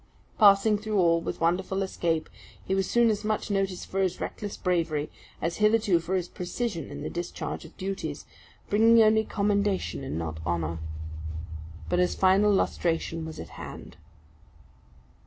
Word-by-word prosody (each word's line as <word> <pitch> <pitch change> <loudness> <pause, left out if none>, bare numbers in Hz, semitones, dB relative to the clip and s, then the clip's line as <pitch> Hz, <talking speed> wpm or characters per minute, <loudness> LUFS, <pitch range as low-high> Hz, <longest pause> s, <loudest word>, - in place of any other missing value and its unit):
Passing 205 0 +6
through 215 0 -2
all 170 -2 +4
with - - -4
wonderful 185 +3 +1
escape, 165 -4 -1 0.4
he 190 - -1
was 195 -1 0
soon 235 -1 +4
as 210 0 -2
much 215 0 -1
noticed 195 -2 -1
for 195 - -3
his 185 -1 0
reckless 205 -1 -5
bravery, 165 -5 0 0.3
as 170 +1 -2
hitherto 210 -4 +3
for 170 +3 -2
his 180 -2 -1
precision 180 - -4
in - - -7
the - - -3
discharge 175 -1 -5
of 160 - -15
duties 195 +1 -4 0.4
bringing 225 +3 +5
only 220 0 +4
commendation 200 -7 0
and 135 - -4
not 80 -1 -4
honour. 85 -1 -2 1.1
But 180 - +1
his 180 - +2
final 195 +2 +4
lustration 165 -4 0
was 160 -1 -8
at - - -7
hand. - - -9
190 Hz, 155 wpm, -27 LUFS, 165-205 Hz, 1.1 s, Passing